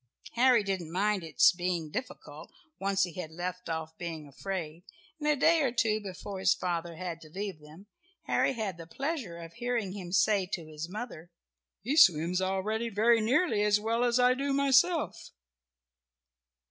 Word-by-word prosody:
Harry 245 -2 +4
didn't 190 -5 -3
mind 200 +1 0
its 160 - +5
being 175 -3 -3
difficult 255 +8 -7 0.3
once 195 0 +1
he 175 -2 -3
had 180 -2 -6
left 180 +2 -5
off 160 0 -4
being 165 -4 -6
afraid, 165 +1 -5 0.4
and 300 - -3
a 300 - +4
day 320 +3 +4
or 265 -4 +1
two 225 -2 +1
before 195 0 -7
his 190 0 +3
father 170 -2 -3
had 170 -1 -6
to 155 - -13
leave 195 0 -5
them, 155 +6 -15 0.4
Harry - - +1
had 210 -7 -4
the 165 - -9
pleasure 270 - -4
of 165 -1 -10
hearing 240 -5 -2
him 185 -3 -7
say 195 -1 +3
to 175 -3 -4
his 155 +1 -7
mother, 200 -5 -7 0.5
"He 265 +7 -1
swims 180 - +5
already 205 +5 -1
very 225 +2 +3
nearly 240 - +2
as 210 0 +3
well 230 +3 0
as 245 0 +2
I 250 0 +5
do 275 +2 -1
myself." 280 +4 +2
195 Hz, 170 wpm, -30 LUFS, 170-235 Hz, 0.5 s, its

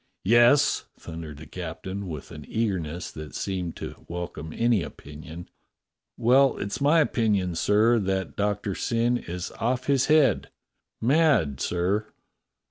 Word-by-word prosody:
"Yes?" 120 +7 +5
thundered 80 -3 -8
the 80 - -10
captain, 95 +4 -6
with 75 -5 -7
an 75 - -9
eagerness 90 -7 -2
that 75 -3 -9
seemed 90 -3 -3
to - - -8
welcome 85 -2 -6
any 115 -1 +2
opinion. 80 +2 -9 0.3
" - - -61
— - - -63
well, 130 +4 +4
it's 100 +7 -4
my 150 +4 +5
opinion, 105 - +1
sir, 110 +7 +3
that 95 -1 -2
Doctor 105 -1 -1
Syn 120 +4 0
is 90 +1 -6
off 125 +2 0
his 135 -2 +2
head 150 -8 +3 0.3
— - - -55
mad, 130 - +3
sir." 95 +5 0
100 Hz, 140 wpm, -26 LUFS, 85-120 Hz, 0.3 s, Yes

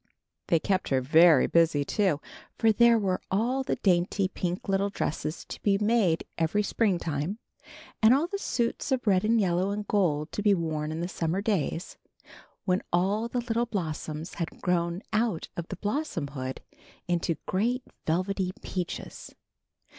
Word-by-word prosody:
They 170 - +4
kept 190 +3 0
her 135 - +3
very 155 +2 +6
busy, 160 -4 +3
too, 185 -4 +1 0.4
for 225 - +4
there 235 +2 +5
were 190 -4 0
all 240 +7 +1
the 265 - -1
dainty 185 +1 +1
little 195 +2 -1
pink - - -17
dresses 155 +1 -3
to - - -8
be 200 -1 +3
made 210 -6 +2
every 170 +6 +1
Springtime, 175 -5 0 0.6
and 220 +1 +7
all 280 +5 +4
the 395 +3 -4
suits 240 -3 -1
of 260 -2 0
red 190 -3 +3
and 225 +2 +3
yellow 185 -1 +1
and 205 0 -3
gold 155 -7 +1
to - - -3
be 205 -1 +4
worn 155 -3 -2
in 160 +1 -3
the 175 - -1
summer 170 0 -1
days 195 -5 -2 0.7
when 185 -1 +2
all 195 +6 +1
the 245 +1 -2
little 235 0 -1
blossoms 160 -5 -4
had 170 -3 -5
grown 175 +1 0
out 215 -5 0
of 170 -1 -5
blossomhood 145 - -3 0.5
into 175 -1 0
great 240 +7 0 0.2
velvety 185 +3 0
peaches. 180 -2 -5
185 Hz, 155 wpm, -28 LUFS, 165-215 Hz, 0.7 s, and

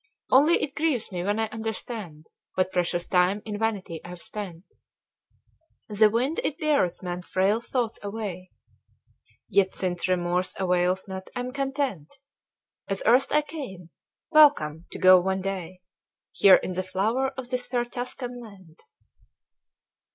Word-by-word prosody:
Only 295 +6 +5
it 275 - -3
grieves 300 -9 -1
me 180 -2 -3
when 205 +3 0
I 225 - +2
understand 220 -7 -6 0.3
What 185 0 +1
precious 175 -1 -1
time 185 +3 +2
in 210 -2 -5
vanity 200 -7 -2
I've 175 0 -9
spent 185 -3 -7 1.3
The 210 +1 +5
wind 250 +8 0
it 295 - -1
beareth 285 - +1
man's 180 0 -5
frail 200 +4 +2
thoughts 235 -2 -2
away. 200 -3 -5 1.0
Yet, 190 -1 +2
since 180 -2 -2
remorse 180 0 0
avails 180 0 +1
not, 190 0 -7
I'm 250 +1 -4
content, 270 - -2 0.8
As 195 0 -2
erst 245 +4 +4
I 300 0 +4
came, 245 - -8 0.4
WELCOME 180 - +5
to - - -8
go 185 -1 +7
one 190 +1 -1
day, 185 -2 -5 0.5
Here 195 -2 +7
in 185 - -2
the 185 - -1
Flower 210 +8 0
of 255 -1 -6
this 250 -1 -1
fair 245 -1 0
Tuscan 245 0 -5
land. 190 -7 -14
200 Hz, 140 wpm, -26 LUFS, 180-245 Hz, 1.3 s, go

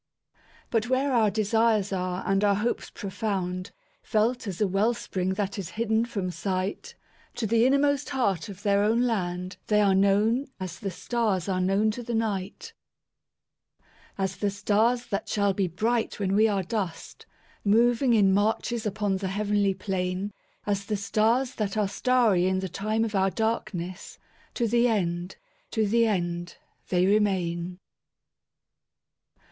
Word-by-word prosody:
But 230 +1 0
where 265 +1 +1
our 225 -3 +4
desires 215 -1 +1
are 180 -1 -2
and 195 +1 +1
our 200 -1 +4
hopes 220 +4 -2
profound, 190 -3 -3 0.3
Felt 225 +2 0
as 185 -3 -5
a 210 - +3
well 205 +5 +1
spring 185 -2 -2
that 200 0 -2
is 185 -3 -5
hidden 225 0 +1
from 195 -6 -3
sight, 195 - -3 0.4
To 230 - -2
the 230 +3 +3
innermost 285 +1 +2
heart 200 - 0
of 200 0 -10
their 200 -1 +3
own 225 +4 +2
land 180 -5 -2
they 210 -1 +3
are 200 -2 +4
knownAs 200 0 +1
the 200 - -3
stars 210 -2 -1
are 185 -1 0
known 195 +4 +2
to 245 - -6
the 240 0 -3
Night; 205 -4 -3 1.4
As 190 -1 -2
the 205 - 0
stars 215 +5 +1
that 200 -1 -3
shall 200 -1 +1
be 190 -1 0
bright 220 +8 -1
when 195 -1 0
we 215 +2 +5
are 200 -3 0
dust, 185 -3 -5 0.4
Moving 235 +4 +3
in 195 -3 +4
marches 220 +3 0
upon 205 -1 -1
the 190 0 -3
heavenly 205 0 +1
plain; 185 +1 -2 0.3
As 200 -1 -1
the 210 +1 -2
stars 225 +6 +1
that 210 -3 -3
are 210 -2 +2
starry 215 -4 +2
in 190 0 +1
the 190 0 -3
time 215 +5 -1
of 220 - -5
our 195 -1 +2
darkness, 200 -4 -3 0.4
To 235 - +1
the 235 +2 +3
end, 180 -4 -1 0.3
to 220 -2 0
the 230 +2 +3
end, 175 -4 -2 0.3
they 180 0 +3
remain. 185 -4 +1
205 Hz, 150 wpm, -27 LUFS, 190-225 Hz, 1.4 s, we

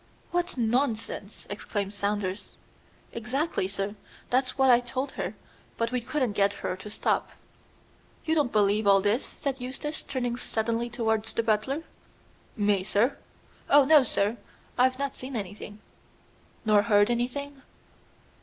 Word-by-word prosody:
"What 350 -3 -1
nonsense!" 230 -3 -1
exclaimed 205 -1 -3
Saunders. 200 -1 -2 0.6
"Exactly, 245 - -1
sir; 195 +1 -3 0.4
that's 255 +1 +1
what 265 -1 +6
I 240 - +7
told 255 +3 -3
her; - - -4 0.4
but 230 +1 0
we 250 -1 0
couldn't 255 -1 0
get 200 0 +2
her 180 - -1
to 195 +2 -9
stop." 210 - 0 1.0
"You 320 - +2
don't 295 -6 +2
believe 210 0 +3
all 195 0 +7
this?" 210 +6 +1
said 270 -2 -4
Eustace, 275 +5 -4
turning 245 -3 -2
suddenly 230 0 -1
towards 220 -2 -1
the 230 - 0
butler. 225 +8 0 0.7
"Me, 205 -2 +2
sir? 225 +7 +2 0.5
Oh, 285 -1 +7
no, 300 -1 +7
sir! 210 -1 0 0.4
I've 255 +1 +3
not 280 0 -2
seen 260 +1 -7
anything." 205 0 -6 0.9
"Nor 210 -1 +5
heard 205 +1 +4
anything?" 270 +4 -2
230 Hz, 135 wpm, -28 LUFS, 205-265 Hz, 1.0 s, I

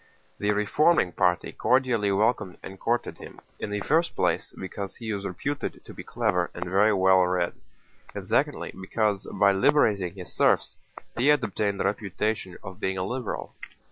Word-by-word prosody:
The 105 - 0
reforming 105 - +3
party 90 0 +1
cordially 125 -6 +2
welcomed 105 -1 +1
and 95 0 -9
courted 120 +1 -1
him, - - -11 0.2
in - - -4
the 105 0 -2
first 165 +9 +1
place - - 0
because 95 +1 -6
he 110 -2 -4
was 100 -1 -3
reputed 140 +10 -4
to - - -10
be - - -9
clever 100 -7 0
and 85 - -4
very 100 +4 +3
well 95 -1 +5
read, 90 -1 0 0.6
and - - -5
secondly - - 0
because 105 0 -1
by 100 0 +4
liberating 100 - +2
his 90 -3 -8
serfs - - +2 0.4
he 120 +4 +1
had 150 0 +4
obtained 100 -1 -1
the - - 0
reputation 100 -1 -2
of 95 -1 -9
being 95 0 -1
a 90 - -1
liberal. 120 +2 -4
100 Hz, 170 wpm, -26 LUFS, 95-115 Hz, 0.6 s, well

